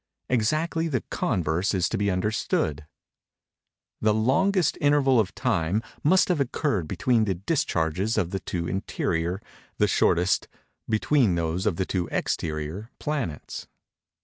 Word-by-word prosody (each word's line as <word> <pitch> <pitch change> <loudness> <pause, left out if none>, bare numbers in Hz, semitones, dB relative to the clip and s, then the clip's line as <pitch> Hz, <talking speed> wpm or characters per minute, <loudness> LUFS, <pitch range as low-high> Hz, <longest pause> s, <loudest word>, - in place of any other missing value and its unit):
Exactly 155 +8 +1
the 135 -6 -1
converse 95 - 0
is 90 -2 +2
to - - -2
be 100 +1 +1
understood. 90 -6 -1 1.1
The 110 -1 +3
longest 175 - +2
interval 145 -3 +4
of 100 -4 0
time 105 -3 0 0.2
must 185 +6 +5
have 175 -4 +2
occurred 125 - 0
between 125 - +2
the 95 -3 0
discharges 95 - 0
of 90 -1 0
the 95 - -2
two 85 -2 -3
interior; 90 -2 -1 0.4
the - - +3
shortest, 90 +2 +2 0.4
between 110 -2 +3
those 85 +3 -1
of 100 - +1
the 95 - -1
two 90 -2 -2
exterior, 80 +7 -2
planets. 140 - -4
105 Hz, 130 wpm, -26 LUFS, 85-135 Hz, 1.1 s, must